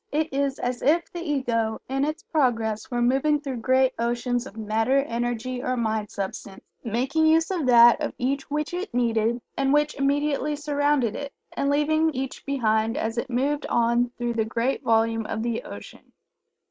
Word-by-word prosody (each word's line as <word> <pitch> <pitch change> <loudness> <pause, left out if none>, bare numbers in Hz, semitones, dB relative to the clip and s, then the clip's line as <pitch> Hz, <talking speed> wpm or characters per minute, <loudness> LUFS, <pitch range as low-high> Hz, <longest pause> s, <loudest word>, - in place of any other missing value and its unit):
It 310 0 -1
is 275 0 0
as 245 0 -3
if 335 +4 +1
the 345 - -5
Ego 240 -8 -1
in 270 +1 -1
its 305 +1 -4
progress 225 -7 0
were 240 -1 0
moving 275 +4 +2
through 275 -4 -5
great 260 +2 +2
oceans 240 +1 -1
of - - -13
Matter, 225 +4 +1
Energy, 240 0 -3
or 255 0 -1
Mind 220 -3 -1
substance, 195 0 -6 0.2
making 260 +8 +1
use 325 +3 +3
of 335 -8 -1
that 240 -1 +7
of - - -3
each 270 +3 -2
which 300 +3 -2
it 365 +4 -4
needed 230 -1 +1 0.2
and 270 0 +1
which 295 +1 +2
immediately 285 +1 0
surrounded 290 -5 0
it, 285 0 -5 0.2
and 280 - -1
leaving 310 +2 +2
each 265 0 -4
behind 225 -4 +1
as 225 +1 -2
it 235 - -4
moved 280 +4 -1
on 235 +1 +2
through 240 -1 -2
the 225 -1 +1
great 230 +4 -1
volume 225 0 +1
of 220 0 -3
the 235 -1 -2
ocean. - - -11
255 Hz, 175 wpm, -25 LUFS, 230-290 Hz, 0.2 s, that